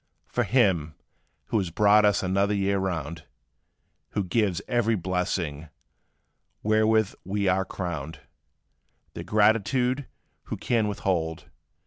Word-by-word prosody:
"From -, -, -1 dB
Him, 90 Hz, -, +2 dB, 0.5 s
who 110 Hz, -, +2 dB
has 95 Hz, -4 st, -2 dB
brought 105 Hz, +4 st, +4 dB
us 105 Hz, -2 st, +2 dB
another 100 Hz, +2 st, +1 dB
year 100 Hz, 0 st, +1 dB
round, 85 Hz, -4 st, -3 dB, 0.9 s
Who 100 Hz, -, 0 dB
gives 95 Hz, -2 st, 0 dB
every 115 Hz, -2 st, +1 dB
blessing, 85 Hz, -4 st, -2 dB, 0.9 s
wherewith 110 Hz, -1 st, +3 dB
we 100 Hz, +1 st, -1 dB
are 95 Hz, +1 st, +2 dB
crowned, 80 Hz, -5 st, -5 dB, 0.9 s
Their -, -, -6 dB
gratitude 115 Hz, +5 st, +2 dB, 0.4 s
who -, -, -5 dB
can 115 Hz, -3 st, +1 dB
withhold? 85 Hz, -5 st, -2 dB
100 Hz, 110 wpm, -26 LUFS, 90-110 Hz, 0.9 s, brought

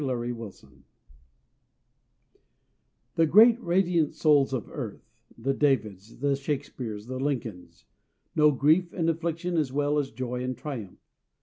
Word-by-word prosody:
_ -, -, -2 dB
VICTORY 120 Hz, -3 st, -2 dB
IN -, -, -5 dB, 0.2 s
DEFEAT -, -, -22 dB, 2.3 s
The 165 Hz, -, +5 dB
great, 225 Hz, +7 st, +6 dB
radiant 170 Hz, -3 st, +1 dB
souls 145 Hz, -3 st, +3 dB
of 130 Hz, -4 st, -3 dB
earth -, -, -7 dB, 0.3 s
the 135 Hz, -, -1 dB
Davids, 115 Hz, -8 st, -1 dB
the 140 Hz, +1 st, +1 dB
Shakespeares, 135 Hz, -7 st, -4 dB
the 130 Hz, +1 st, -5 dB
Lincolns 125 Hz, -9 st, -4 dB, 0.5 s
know 150 Hz, 0 st, +6 dB
grief 155 Hz, +6 st, +3 dB
and 165 Hz, -3 st, -1 dB
affliction 170 Hz, +1 st, -3 dB
as 150 Hz, -5 st, 0 dB
well 145 Hz, +1 st, +1 dB
as 140 Hz, -2 st, -2 dB
joy 125 Hz, +1 st, -4 dB
and 130 Hz, -1 st, -3 dB
triumph. 125 Hz, -8 st, -7 dB
140 Hz, 135 wpm, -27 LUFS, 125-160 Hz, 2.3 s, great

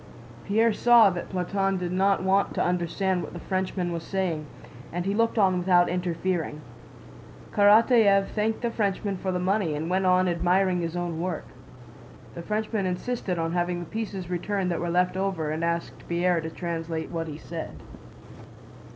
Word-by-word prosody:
Pierre 220 Hz, +2 st, +3 dB
saw 235 Hz, -3 st, +6 dB
that 175 Hz, -1 st, -5 dB
Platón 195 Hz, +1 st, -1 dB
did 180 Hz, -1 st, -3 dB
not 190 Hz, +1 st, +2 dB
want 195 Hz, +1 st, +2 dB
to -, -, +1 dB
understand 180 Hz, +1 st, 0 dB
what -, -, -7 dB
the 175 Hz, -, -6 dB
Frenchman 185 Hz, -1 st, -2 dB
was 170 Hz, -1 st, -3 dB
saying, 170 Hz, -5 st, -2 dB, 0.4 s
and 175 Hz, +1 st, -3 dB
he 195 Hz, -, 0 dB
looked 230 Hz, +2 st, +1 dB
on 190 Hz, -3 st, +3 dB
without 175 Hz, -1 st, +4 dB
interfering. 175 Hz, -3 st, -2 dB, 0.9 s
Karatáev 205 Hz, -1 st, +5 dB
thanked 220 Hz, +1 st, -1 dB
the 235 Hz, -1 st, -1 dB
Frenchman 200 Hz, -2 st, -1 dB
for 190 Hz, 0 st, -3 dB
the 180 Hz, -, -1 dB
money 185 Hz, -3 st, 0 dB
and 160 Hz, +4 st, -3 dB
went 190 Hz, 0 st, +2 dB
on 185 Hz, 0 st, +4 dB
admiring 180 Hz, +1 st, +2 dB
his 165 Hz, 0 st, -3 dB
own 175 Hz, -2 st, -3 dB
work. 180 Hz, -2 st, -3 dB, 0.9 s
The 170 Hz, -, -7 dB
Frenchman 215 Hz, +1 st, -2 dB
insisted 185 Hz, 0 st, -2 dB
on 165 Hz, 0 st, -1 dB
having 175 Hz, 0 st, -1 dB
the 175 Hz, -, -6 dB
pieces 200 Hz, -2 st, -5 dB
returned 180 Hz, +1 st, -1 dB
that 170 Hz, -, -1 dB
were 175 Hz, -, -2 dB
left 180 Hz, +1 st, +1 dB
over 185 Hz, -5 st, -1 dB
and 160 Hz, +2 st, -3 dB
asked 170 Hz, 0 st, -3 dB
Pierre 170 Hz, 0 st, +1 dB
to 160 Hz, -, -5 dB
translate 165 Hz, -1 st, -4 dB
what 165 Hz, -1 st, -3 dB
he 150 Hz, -1 st, -6 dB
said. 165 Hz, 0 st, -7 dB
180 Hz, 170 wpm, -26 LUFS, 170-195 Hz, 0.9 s, saw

